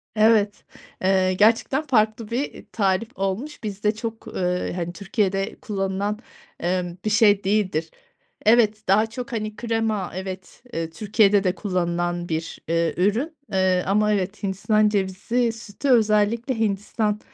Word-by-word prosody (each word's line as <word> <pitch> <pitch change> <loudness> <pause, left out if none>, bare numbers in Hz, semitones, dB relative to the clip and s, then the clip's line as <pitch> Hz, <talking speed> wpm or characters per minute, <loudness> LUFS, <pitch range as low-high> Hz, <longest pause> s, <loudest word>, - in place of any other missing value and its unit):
Evet, 215 -1 +3 0.4
eee, 185 0 +3
gerçekten 225 +8 +3
farklı 220 -5 +1
bir, 240 - 0
eee, - - -12
tarif 200 +1 +1
olmuş. 215 +10 -3
Bizde 210 +1 -1
çok 225 0 -6
ııı, 180 0 -1
hani, 175 -1 -3
Türkiye'de 195 0 -1
kullanılan, 200 0 -2 0.4
emm, 175 0 -2
bir - - +2
şey 210 -2 +4
değildir. 190 -5 0 0.6
Evet, 215 -1 +4
daha 210 +3 +4
çok, 250 +3 -7
hani, 215 -2 -3
krema 225 -4 -1
evet, 190 +3 -7
eee, 165 -1 -2
Türkiye'de 205 +2 +3
de 185 0 +1
kullanılan 175 -2 -2
bir, 160 +1 -3
eee, 165 0 +1
ürün. 225 - +1 0.2
Eee, 185 -1 +2
ama 210 +1 +3
evet, 200 +2 -2
hindistan 210 +2 +2
cevizi 210 +4 0
sütü 225 +4 -5
özellikle 225 +1 +3
Hindistan 210 0 0
205 Hz, 135 wpm, -23 LUFS, 185-220 Hz, 0.6 s, şey